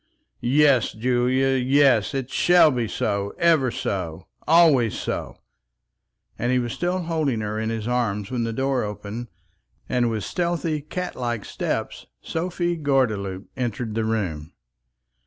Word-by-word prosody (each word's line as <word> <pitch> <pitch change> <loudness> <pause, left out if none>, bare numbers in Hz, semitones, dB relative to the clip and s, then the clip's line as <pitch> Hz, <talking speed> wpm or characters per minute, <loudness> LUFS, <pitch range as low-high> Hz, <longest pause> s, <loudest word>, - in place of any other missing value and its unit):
"Yes, 135 -1 +3
Julia, 125 +3 +1
yes; 135 -2 +3
it 135 -1 -3
shall 175 -3 +5
be 120 -3 -1
so; 100 -1 -2
ever 160 -6 +3
so, 90 -6 -4 0.2
always 155 - +5
so." - - -4 1.0
And 120 +2 0
he 130 - +3
was 120 -2 -1
still 180 +1 -1
holding 155 -8 -1
her 105 0 -3
in 110 0 -2
his 115 -1 -3
arms, 110 -5 -1
when 120 -2 -1
the 115 - -2
door 135 +2 0
opened, 105 +3 -6 0.6
and 125 -2 +1
with 110 -2 -2
stealthy, 170 -3 -1
cat 180 +5 -5
like 120 -4 -3
steps - - -3
Sophie 175 +1 -2
Gordeloup 110 -10 0
entered 120 -3 -3
the 115 +1 -1
room. 90 -8 -2
125 Hz, 140 wpm, -23 LUFS, 110-145 Hz, 1.0 s, shall